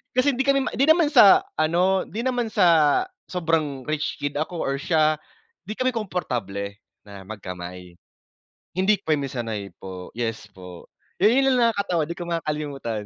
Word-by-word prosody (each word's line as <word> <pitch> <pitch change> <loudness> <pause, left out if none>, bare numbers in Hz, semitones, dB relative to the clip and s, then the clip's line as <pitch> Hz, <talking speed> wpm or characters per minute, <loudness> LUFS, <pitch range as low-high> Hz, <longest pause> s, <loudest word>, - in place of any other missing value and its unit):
Kasi 270 +3 +3
hindi 270 +2 -1
kami 275 0 +4
ma - - -3
di 275 - +2
naman 315 -1 +5
sa 225 -9 +7 0.2
ano, 180 +4 +2
di 220 - -5
naman 245 -2 0
sa 170 - +4 0.2
sobrang 160 -6 -1
rich 155 +2 -2
kid 145 0 -2
ako 165 +2 -3
or 135 - -1
siya, 155 -1 +2 0.5
di 215 - -5
kami 255 +2 0
komportable 120 - -4 0.3
na 100 -2 -12
magkamay. 90 -3 -8 0.8
Hindi 190 +3 +2
po 160 - -3
kami 145 -2 +1
sanay 110 -7 -5
po. 95 -1 -9
Yes 115 -2 -3
po. 90 -2 -11 0.3
Yun, 210 +4 +5
yun 270 +2 +3
lang 235 -2 +3
nakakatawa, 185 -5 0
di 170 - -5
ko 175 - -6
makakalimutan. 145 -9 -3
155 Hz, 165 wpm, -24 LUFS, -, 0.8 s, sa